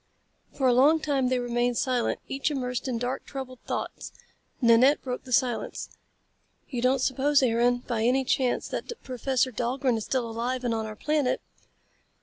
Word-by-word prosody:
For 270 - -2
a 250 - +5
long 290 +6 +5
time 280 -4 0
they 255 0 +1
remained 245 0 0
silent, 250 -1 0
each 275 +2 -1
immersed 250 -3 -3
in 250 -3 -1
dark, 245 +3 -3
troubled 260 -2 -7
thoughts. - - -4 0.5
Nanette 245 +3 +5
broke 250 -1 -4
the 255 - -10
silence. 245 -1 0 0.8
"You 245 -4 -4
don't 255 +1 +2
suppose, 275 +2 +2
Aaron, 245 +1 +2
by 235 -3 -2
any 260 +2 +3
chance 255 -1 +1
that - - -4
Professor 255 0 0
Dahlgren 250 +1 0
is 220 - -4
still 255 -3 -1
alive 240 +3 -3
and 240 -2 0
on 220 -1 -2
our 215 - -7
planet?" 295 +2 0
255 Hz, 165 wpm, -27 LUFS, 240-265 Hz, 0.8 s, a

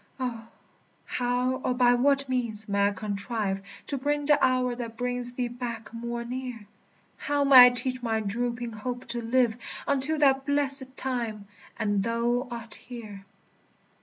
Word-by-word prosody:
O, 235 -3 -4 0.6
how 250 +1 0
or 255 -1 -1
by 245 -1 +5
what 275 +2 +2
means 235 -4 -2
may 200 0 +2
I - - +1
contrive 200 0 -3 0.2
To 280 - -3
bring 290 +2 0
the 290 -1 +4
hour 255 -1 +2
that 230 -2 -6
brings 245 0 -2
thee 245 -1 -1
back 235 -2 -6
more 235 0 -4
near? 250 -3 -5 0.5
How 290 -1 0
may 260 -3 +10
I - - +6
teach 255 +1 -2
my 225 -2 0
drooping 235 +3 -2
hope 245 +3 -5
to 240 0 -3
live 235 -1 +2 0.3
Until 280 +3 +2
that 270 -2 +4
blessèd 275 -2 0
time, 230 -6 -3 0.3
and 205 -3 +1
thou 235 +3 0
art 230 -2 -7
here? 215 -5 -9
245 Hz, 155 wpm, -27 LUFS, 230-260 Hz, 0.6 s, may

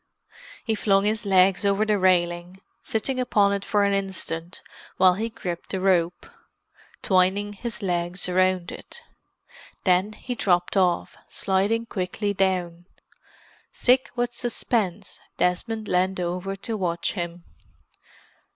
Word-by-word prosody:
He 225 - +1
flung 200 -2 +2
his 215 0 0
legs 190 0 +4
over 200 +1 +2
the 210 -2 +1
railing, 175 0 +1 0.2
sitting 255 +4 -2
upon 205 -5 +3
it 200 -1 -2
for 205 0 +1
an 200 0 +2
instant 185 -3 -3 0.3
while 185 -1 +6
he 220 +5 -3
gripped 180 -7 -6
the 190 - -2
rope, 180 -2 +1 0.8
twining 190 +2 +2
his 225 +1 -5
legs 175 0 -1
round 185 -1 +1
it. - - -11 0.8
Then 185 +3 +2
he 250 - -6
dropped 180 -6 +1
off, 180 -3 +1
sliding 205 +4 0
quickly 200 0 -2
down. 180 -3 -1 0.8
Sick 255 +1 +2
with 245 0 -1
suspense, 215 -5 -2 0.2
Desmond 215 +5 -1
leaned 185 +1 +1
over 180 +2 -3
to 220 +3 -5
watch 170 -3 -1
him. 175 -2 -5
190 Hz, 125 wpm, -24 LUFS, 180-210 Hz, 0.8 s, while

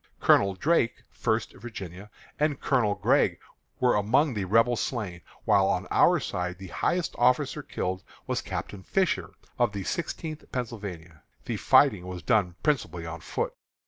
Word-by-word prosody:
Colonel 100 -1 +4
Drake 140 - +1
(First 110 +1 -1
Virginia) 100 -4 -8 0.3
and 150 -2 +1
Colonel 115 -7 +2
Gregg - - +2 0.4
were 125 -1 +4
among 125 +8 +3
the 100 -3 -2
Rebel 115 +5 +4
slain, 105 -8 -3 0.2
while - - +4
on - - 0
our - - +5
side 90 0 -3
the 95 -1 -9
highest 175 - 0
officer 130 +4 +2
killed 95 -8 -3 0.2
was - - -1
Captain 100 - -5
Fisher, 185 - 0 0.2
of 120 -4 +2
the 100 -1 -4
Sixteenth 155 - -4
Pennsylvania. 100 - -6 0.2
The - - -2
fighting 90 - +4
was 90 -1 -6
done 100 -7 +2
principally 115 - 0
on 85 0 -6
foot. - - -3
105 Hz, 145 wpm, -27 LUFS, 90-130 Hz, 0.4 s, our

